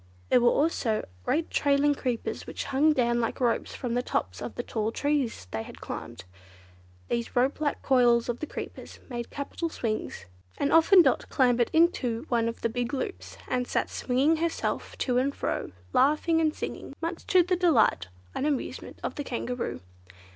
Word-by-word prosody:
There 250 - +5
were 240 - +6
also 255 -8 +1 0.2
great 320 +3 0
trailing 285 0 +3
creepers 250 -4 -3
which - - -4
hung 285 +3 +3
down 240 -4 +2
like 230 - -2
ropes 240 -3 0
from 245 -2 -3
the 245 - +1
tops 90 - -2
of - - -6
the 240 - -3
tall 220 -2 -2
trees 285 - -1
they 110 - -2
had - - -10
climbed. - - -7 0.8
These 235 -1 -2
ropelike 275 +4 +1
coils 240 -3 +4
of 240 0 -2
the 310 - -4
creepers - - -8
made 240 -1 -4
capital 290 +4 -4
swings, 215 - -3 0.3
and 285 - 0
often 340 +3 +7
Dot 265 - +1
clambered 245 -2 +3
into 280 -7 +2
one 235 -2 +2
of 230 - -8
the - - +2
big 245 +3 -2
loops 275 +9 -5
and 250 0 -1
sat - - -1
swinging 270 +6 +2
herself 330 +1 -2
to 250 -2 +1
and 275 +2 0
fro, - - -2 0.2
laughing 305 +4 +3
and 310 -1 +1
singing, 275 - -6
much 335 +1 -4
to 365 -2 +5
the 365 +1 +1
delight 275 - +3 0.3
and 290 - -1
amusement 285 -4 -3
of - - -2
the 290 - -4
Kangaroo. 250 -1 -3
260 Hz, 175 wpm, -28 LUFS, 240-305 Hz, 0.8 s, often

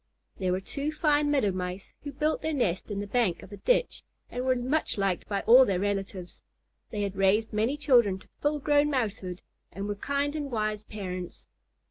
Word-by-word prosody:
There 185 -1 0
were 185 - +1
two 280 +9 -3
fine 300 -2 +2
Meadow 270 -9 +2
Mice 185 +1 -5
who 285 - -5
built 300 +3 0
their 315 - -1
nest 190 -9 0
in 205 -1 -3
the - - -4
bank 205 -4 0
of - - -13
a 205 - -8
ditch - - +1 0.3
and 250 - -3
were 260 0 +2
much 260 +4 -1
liked 195 -3 0
by 200 -1 0
all 250 +3 +8
their 195 -7 0
relatives. 195 -2 -3 0.5
They 210 -2 -2
had 200 -1 -3
raised 195 +3 +2
many 225 +7 +1
children 240 -9 +4
to 190 - -17
full 295 +1 +1
grown 290 +1 +3
Mousehood, 200 -9 -2 0.3
and 200 +1 -5
were 205 - -1
kind 280 +7 -1
and 290 -2 -3
wise 215 -3 -1
parents. 185 -4 -7
215 Hz, 195 wpm, -28 LUFS, 195-280 Hz, 0.5 s, all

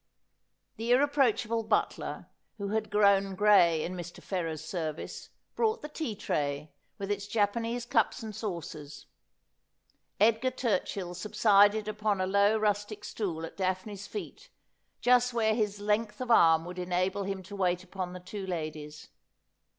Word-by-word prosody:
The 230 +1 -4
irre 260 +4 +5
proachable 230 -5 +1
butler, - - -1 0.3
who 200 -2 -4
had 215 0 -1
grown 200 -2 +3
gray 185 -6 +5
in 180 - -4
Mr. 175 -1 -7
Ferrers's 165 -5 -4
service, 160 -4 -5 0.3
brought 445 0 0
the - - -4
tea 300 -7 -4
tray, 145 -4 -2 0.3
with 200 0 -4
its 200 0 -2
Japanese 230 +3 0
cups 240 0 +1
and 215 -2 -6
saucers. 170 -8 -6 1.1
Edgar 225 +4 +4
Turchill 195 -7 -2
subsided 205 +2 +4
upon 210 -1 -1
a 185 - +1
low 200 +3 +3
rustic 210 0 -1
stool 175 -7 -3
at - - -11
Daphne's 190 +2 -3
feet, 460 +4 -8 0.5
just 245 0 +4
where 220 -2 +3
his 210 -2 -1
length 210 +1 0
of 250 -2 -2
arm 165 -6 +6
would 180 +1 -7
enable 185 +2 0
him 195 -1 -4
to 200 +3 -9
wait 180 -2 0
upon 185 -1 -5
the 180 - -7
two 190 +2 -7
ladies. 155 -3 -5
205 Hz, 145 wpm, -30 LUFS, 180-220 Hz, 1.1 s, arm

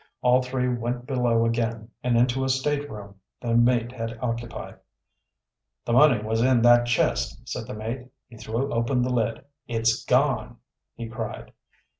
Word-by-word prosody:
All 125 +1 +5
three 125 0 -1
went 120 0 -2
below 120 -3 +1
again, 115 -1 -2
and 125 -1 +2
into 125 +2 +2
a 130 - -1
stateroom 130 -7 -2 0.2
the 120 -2 -2
mate 120 0 +3
had 115 -2 -5
occupied. 115 -1 -5 1.1
"The 120 - -1
money 135 -2 +6
was 110 +1 0
in 125 -1 +3
that 120 0 +6
chest," 120 - 0
said - - -5
the - - -6
mate. 115 +4 -5 0.2
He 120 - -15
threw 115 +5 -3
open 120 +2 +1
the 125 0 -1
lid. 120 +4 -1 0.2
"It's 115 0 0
gone!" 125 -3 +1 0.4
he 115 - -6
cried. 110 - -6
120 Hz, 155 wpm, -25 LUFS, 115-125 Hz, 1.1 s, money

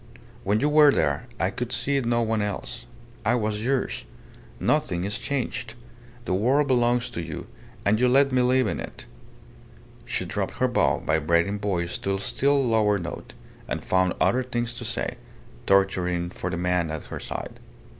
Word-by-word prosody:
When 105 +2 +2
you 145 - +3
were 150 0 +7
there, - - 0
I 95 +2 +1
could 125 +4 -4
see 140 +2 +1
no 120 -1 +1
one 110 -1 0
else. 100 -11 -4 0.4
I 110 +3 +3
was 105 -2 -1
yours. 130 - -1 0.5
Nothing 100 - +1
is 100 +2 -2
changed. 125 -4 -3 0.5
The 95 - -1
world 130 +10 +3
belongs 120 -2 +2
to 85 - -4
you, 80 -3 -6 0.4
and 110 +3 +3
you 125 - +5
let 135 +2 +4
me 130 -1 +3
live 130 +1 +3
in - - -2
it."... - - -8 1.0
She - - -2
dropped - - -3
her - - +2
low, - - +1
vibrating 85 +5 +2
voice 90 -4 -2
to 100 0 -1
a - - -1
still 140 +5 +2
lower 105 -3 +3
note, 85 -2 -7 0.3
and - - -4
found 95 -1 +2
other 130 - +3
things 120 -2 -2
to 115 - -6
say - - -2 0.5
torturing 90 -3 +2
for 90 - -4
the 90 - -3
man 90 -1 +1
at 80 -1 -4
her - - -4
side. - - -6
105 Hz, 175 wpm, -25 LUFS, 90-125 Hz, 1.0 s, were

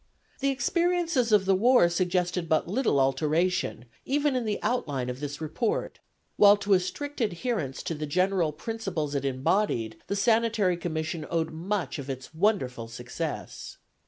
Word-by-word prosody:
The 275 - +1
experiences 335 -3 +1
of 205 -3 +5
the 195 - +4
war 235 0 +5
suggested 175 0 0
but 160 -1 +2
little 195 - +1
alteration, 150 +1 +1 0.2
even 285 0 +1
in 250 -2 -1
the 210 -1 -1
outline 145 - -1
of 125 - -8
this 145 0 -5
report, 160 +9 -2 0.4
while 205 0 +7
to 200 0 +1
a 185 - +6
strict 285 +10 -5
adherence 205 - -2
to - - -2
the 150 -1 -4
general 185 0 +1
principles 175 -5 -4
it 140 -1 -1
embodied 135 - 0
the 200 - -1
Sanitary 220 -3 +2
Commission 160 -2 -3
owed 165 -1 -1
much 170 -2 -3
of 140 0 -7
its 130 +2 -6
wonderful 160 - 0
success. 125 +7 -6
180 Hz, 155 wpm, -27 LUFS, 150-220 Hz, 0.4 s, while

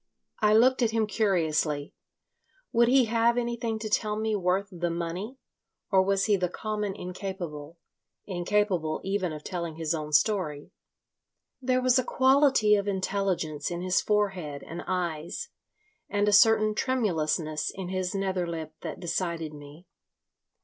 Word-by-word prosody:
I 210 -1 +4
looked 255 +3 +5
at 235 - +3
him 225 -1 +1
curiously. 165 -8 0 0.8
Would 235 0 +4
he 255 0 +5
have 230 +1 +2
anything 235 -2 -1
to 220 0 -5
tell 210 0 0
me 220 0 -1
worth 190 +1 0
the 175 -1 -2
money, 175 +9 -4 0.5
or 190 -1 +5
was 195 +1 +1
he 210 - +3
the 180 -2 -1
common 210 0 -3
incapable—incapable 180 0 -4
even 195 -2 -1
of 150 -1 -7
telling 170 -4 -4
his 160 0 -1
own 155 -2 -4
story? 150 -3 +1 0.9
There 255 0 +1
was 255 0 +4
a - - +1
quality 260 -4 +4
of 205 -1 +2
intelligence 190 -5 -1
in 175 0 -4
his 185 0 +2
forehead 190 -9 -1
and 170 - -6
eyes, 175 - -3 0.6
and 205 0 +1
a 210 - +3
certain 215 +1 +5
tremulousness 165 - 0
in 190 -2 -6
his 185 0 -2
nether 190 -2 -1
lip 160 -2 -5
that - - -6
decided 170 -3 -2
me. 145 +4 -12
190 Hz, 145 wpm, -27 LUFS, 170-215 Hz, 0.9 s, looked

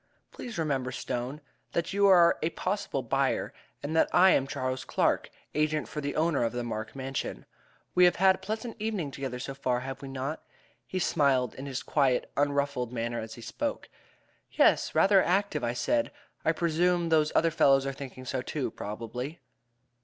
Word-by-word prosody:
"Please 235 -4 -7
remember, 135 -5 -1
Stone, 125 +4 -4 0.3
that 170 +2 -1
you 200 0 +4
are 175 -3 +6
a 160 - +1
possible 185 -7 -2
buyer, 135 +3 0 0.3
and 150 +3 -3
that 160 - +4
I 185 +1 +6
am 135 - +2
Charles 130 -1 -3
Clark, - - +1 0.2
agent 155 0 0
for 150 - -5
the 145 0 -3
owner 155 -5 +2
of 115 - -1
the 120 0 -2
Mark 110 0 -5
Mansion. 135 0 -4 0.5
We 180 0 +6
have 175 - +4
had 190 +1 +5
a - - -7
pleasant 220 +2 -5
evening 210 -9 -2
together 130 -2 -4
so 135 +2 -5
far, 125 -2 -1
have 135 0 -6
we 140 - -7
not?" 135 +3 -4 0.5
He 185 - -4
smiled 135 -8 +2
in 135 +2 -8
his 130 -2 -4
quiet, 135 -4 +1
unruffled 140 -3 0
manner 120 -1 -2
as 110 0 -7
he 120 - -11
spoke. 285 - -4 0.6
"Yes - - +3
rather 195 -1 +6
active," 185 -6 0
I 120 0 0
said. 290 - 0 0.3
"I 160 - +3
presume 170 +1 +1
those 155 -1 +3
other 165 0 +4
fellows 135 -3 +4
are 135 - -2
thinking 130 -1 -9
so 130 0 -2
too, 140 +2 -3
probably." 120 +8 -6
140 Hz, 180 wpm, -29 LUFS, 130-170 Hz, 0.6 s, are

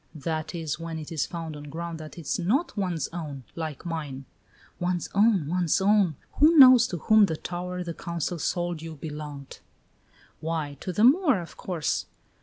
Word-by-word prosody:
"That 155 +2 -3
is 160 -2 -3
when 165 -1 -5
it 155 0 -8
is 160 -4 -1
found 165 -3 -6
on 145 0 -9
ground 165 +2 -6
that 155 +1 -10
is 165 0 -2
not 240 - 0
one's 180 -8 -1
own, 150 -6 -6
like 160 -1 -5
mine!" 150 -5 -5 0.5
"One's 175 -1 -1
own! 205 -6 +3
One's 175 +1 +1
own! 195 -4 +3 0.2
Who 315 +3 +6
knows 255 -3 +9
to 180 - -4
whom 215 +3 +5
that 160 -3 -5
tower 180 +1 -4
the 170 -1 -5
Council 170 0 -4
sold 175 +1 -2
you 165 -1 -7
belonged!" 150 -2 -8 0.8
"Why, 155 -3 -3
to 185 - -4
the 210 +5 +1
Moor, 280 - +5
of 170 - -9
course!" 170 -7 -2
170 Hz, 175 wpm, -26 LUFS, 155-185 Hz, 0.8 s, knows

